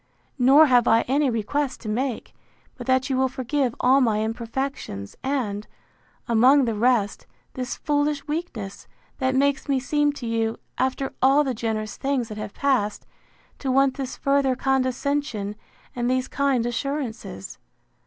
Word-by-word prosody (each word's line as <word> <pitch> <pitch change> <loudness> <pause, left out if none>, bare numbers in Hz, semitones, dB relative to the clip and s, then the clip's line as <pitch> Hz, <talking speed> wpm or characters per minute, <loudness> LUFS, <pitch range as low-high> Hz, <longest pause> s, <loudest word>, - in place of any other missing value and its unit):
Nor 275 +5 +7
have 245 -4 +4
I 225 +1 +5
any 280 +2 +1
request 255 +5 -1
to 225 - -8
make, 245 +3 -2 0.4
but - - -9
that 260 0 +2
you 270 - 0
will 265 0 +3
forgive 260 0 -1
all 265 +2 +4
my 215 -3 +2
imperfections 230 - -4
and, 225 -7 -2 0.6
among 255 +4 +5
the 230 - 0
rest, 220 -2 +1 0.3
this 255 0 -4
foolish 290 -1 0
weakness, 295 - -5 0.3
that 260 -1 +1
makes 280 +1 +1
me 270 -1 +2
seem 295 +2 +1
to 270 - -7
you, 225 -1 -1 0.2
after 265 +1 -1
all 275 +3 +5
the 265 -3 -1
generous 215 -2 -3
things 270 -4 -1
that 215 - -7
have 210 - -6
passed, 250 -7 0 0.5
to 270 - -3
want 270 0 +3
this 270 -3 -5
further 275 -2 +2
condescension, 260 -4 -1 0.4
and 240 0 -1
these 255 0 0
kind 275 -4 +1
assurances. 240 - -4
260 Hz, 150 wpm, -24 LUFS, 230-275 Hz, 0.6 s, Nor